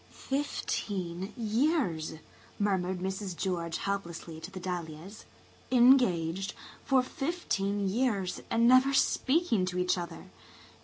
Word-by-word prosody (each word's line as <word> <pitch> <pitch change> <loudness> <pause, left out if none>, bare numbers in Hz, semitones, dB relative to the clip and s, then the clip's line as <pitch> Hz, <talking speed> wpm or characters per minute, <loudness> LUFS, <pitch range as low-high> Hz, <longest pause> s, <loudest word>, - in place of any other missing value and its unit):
"Fifteen 195 -9 -3
years!" 225 - 0 0.4
murmured 190 -3 0
Mrs. 190 -1 -3
George 170 -3 -2
helplessly 170 -5 -4
to 165 - -8
the 190 -1 -8
dahlias. 175 +2 -6 0.4
"Engaged 200 -8 +4 0.3
for 265 -2 +3
fifteen 205 - -2
years 200 -3 0
and 230 +1 +3
never 255 +2 +6
speaking 270 - +2
to 180 0 -3
each 180 0 +1
other! 170 -1 -8
195 Hz, 105 wpm, -30 LUFS, 180-250 Hz, 0.4 s, never